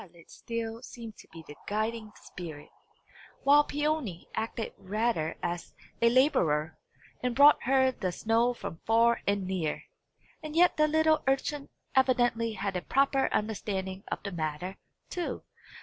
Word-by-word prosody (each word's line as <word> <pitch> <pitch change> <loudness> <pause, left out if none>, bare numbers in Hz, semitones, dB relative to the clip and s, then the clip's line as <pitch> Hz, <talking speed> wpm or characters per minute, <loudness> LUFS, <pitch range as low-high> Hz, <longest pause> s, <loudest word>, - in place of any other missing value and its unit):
Violet 170 -3 -18
still 230 0 -5
seemed 230 -4 -9
to - - -14
be 165 0 -11
the 150 - -10
guiding 215 +1 -2
spirit, 160 -5 -9 0.7
while 290 +1 +6
Peony 295 - -2
acted 225 0 -3
rather 210 -5 -1
as 175 0 -4 0.3
a 235 - +6
labourer, 160 - +2 0.5
and 250 -1 -1
brought 290 +2 +7
her 260 0 +4
the 185 -7 -3
snow 225 +6 +2
from 165 - -7
far 230 +1 +4
and 200 -1 +1
near. 180 -5 -2 0.6
And 310 0 -7
yet 355 +1 +5
the 305 0 +4
little 315 0 +3
urchin 275 +1 0 0.3
evidently 240 -3 +2
had 195 -1 -3
a 180 - -1
proper 275 +3 +2
understanding 195 -3 -2
of - - -3
the 200 - -4
matter, 165 +2 -4 0.3
too! 350 -1 -3
225 Hz, 145 wpm, -29 LUFS, 185-265 Hz, 0.7 s, brought